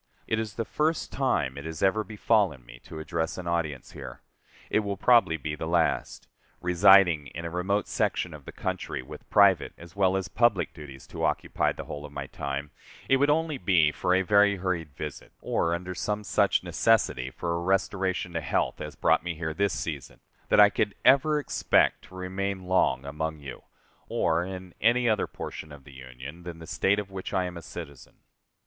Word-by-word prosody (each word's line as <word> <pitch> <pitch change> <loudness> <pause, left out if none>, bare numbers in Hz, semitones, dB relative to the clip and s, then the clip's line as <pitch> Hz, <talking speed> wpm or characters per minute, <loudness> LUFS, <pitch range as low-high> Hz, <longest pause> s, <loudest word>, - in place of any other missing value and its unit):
It 110 - 0
is 110 -3 -4
the 115 - -2
first 155 +6 -1
time 70 - 0
it 70 - -9
has 80 +1 -5
ever 110 +3 +3
befallen 105 - +1
me - - -13
to - - -9
address 80 +1 -3
an 90 - -6
audience 85 -5 -2
here. - - -9 0.5
It - - +4
will 100 -2 -3
probably 115 -7 +4
be 75 +1 -4
the 80 +1 -4
last. 85 -1 0 0.3
Residing 90 -4 +5
in 85 +2 -5
a 85 - -4
remote 95 +4 0
section 90 - -1
of 75 -3 -11
the - - -8
country, 90 -7 -4
with - - -12
private 95 -7 +4
as 85 0 -13
well 95 -1 +3
as 95 -1 -3
public 110 -3 +2
duties 70 -4 -11
to - - -7
occupy - - 0
the - - -7
whole 75 0 -7
of 75 - -9
my 70 -1 -5
time, 70 +1 -5 0.4
it 135 - +4
would 145 +2 +3
only 155 -1 +1
be 85 -5 +3
for 90 +4 +1
a 95 - +2
very 100 +1 +4
hurried 90 -4 -2
visit, 75 0 -7
or 85 0 0
under 90 +1 -5
some 105 +3 -2
such 95 - +2
necessity 75 - +2
for 85 +5 -3
a 85 - -1
restoration 95 -1 0
to 85 - -2
health 70 - -1
as - - -6
brought - - +3
me 85 -1 -4
here 80 0 -3
this 100 +2 0
season, 75 -5 -6 0.3
that - - +4
I 105 0 +8
could 100 - -1
ever 150 +3 +5
expect 150 - +2
to 95 - -15
remain 95 +1 -3
long 90 -7 +2
among 80 +2 -3
you, 70 -3 -10 0.4
or 85 +1 +1
in 95 -1 -7
any 120 +2 +3
other 110 -2 +2
portion 80 - -7
of 70 -2 -12
the 70 - -15
Union 65 +5 -10
than 85 -1 -8
the 80 - -10
State 95 +4 +1
of 100 -1 -4
which 95 -1 -5
I 95 - +2
am 90 0 -6
a 85 - -7
citizen. 70 -4 -10
90 Hz, 200 wpm, -27 LUFS, 75-100 Hz, 0.5 s, I